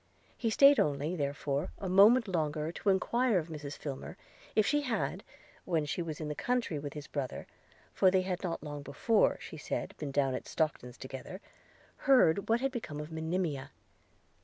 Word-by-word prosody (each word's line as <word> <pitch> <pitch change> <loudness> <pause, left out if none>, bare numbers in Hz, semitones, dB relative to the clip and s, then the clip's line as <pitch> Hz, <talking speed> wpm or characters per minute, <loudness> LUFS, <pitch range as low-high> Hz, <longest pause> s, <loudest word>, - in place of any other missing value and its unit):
He 230 - -1
staid 275 +5 +7
only, 150 +4 0
therefore, 145 -1 -2
a 195 - -5
moment 210 +6 +6
longer 155 -3 -1
to 200 - -2
enquire 235 +4 +2
of 170 -1 -2
Mrs 145 -2 -6
Filmer, 140 -3 -6 0.4
if 215 - +4
she 295 +5 +2
had, 250 -6 -2 0.4
when 165 -4 0
she 150 - -2
was 160 -3 -5
in 155 - -4
the 150 - -2
country 240 -5 -1
with 145 -1 -6
his 150 -2 -7
brother 140 -5 -4 0.5
(for 190 - +5
they 185 0 +2
had 185 -1 -3
not 170 -5 -3
long 145 -1 -6
before, 205 +10 +2
she 160 - -9
said, 150 - -4
been 150 - -3
down 135 -1 +1
at - - -5
Stockton's 140 -6 -2
together), 135 +8 -8 0.7
heard 200 -9 +5
what 230 +2 +3
was 270 0 0
become 220 - -5
of 150 +2 -7
Monimia. 160 -4 -2
160 Hz, 180 wpm, -31 LUFS, 145-200 Hz, 0.7 s, staid